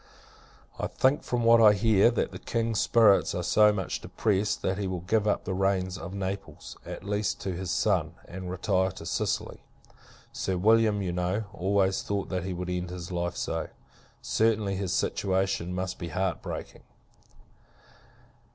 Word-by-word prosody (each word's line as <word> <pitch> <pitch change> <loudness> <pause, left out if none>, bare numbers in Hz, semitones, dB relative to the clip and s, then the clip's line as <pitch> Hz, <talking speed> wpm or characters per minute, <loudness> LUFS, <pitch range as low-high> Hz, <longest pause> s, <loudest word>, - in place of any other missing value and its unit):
I - - -1
think, 135 +3 +2
from 120 -1 -2
what 115 0 +6
I 105 -2 +8
hear, 105 +1 +4
that 120 - -1
the - - -8
King's 115 -2 -1
spirits 110 -4 +4
are 90 - -2
so 105 +4 +5
much 95 -3 -3
depressed, 105 -1 -1
that 95 +1 0
he 100 - -1
will 90 -2 -3
give 105 +4 +1
up 105 - +1
the 95 - -2
reins 95 -1 0
of 95 - -7
Naples, 95 -4 -5
at - - -7
least, 105 +1 -1
to 95 - -3
his 90 +1 -5
son, - - +1
and 95 0 -7
retire 95 +1 +1
to 95 - -10
Sicily. - - -2 0.7
Sir 95 -1 -2
William, 105 +1 +3
you 90 - -2
know, 90 +4 -1
always 95 +1 +1
thought, 100 -1 -3
that 90 -2 -2
he 95 - -3
would 90 0 -4
end 90 0 -3
his 90 0 -7
life 85 0 -2
so. 80 -1 -2 0.6
Certainly, 105 -3 +1
his 95 -2 -2
situation 95 -2 0
must 95 0 -3
be 85 - -4
heart 90 +2 -2
breaking! - - -7
95 Hz, 170 wpm, -28 LUFS, 90-105 Hz, 0.7 s, I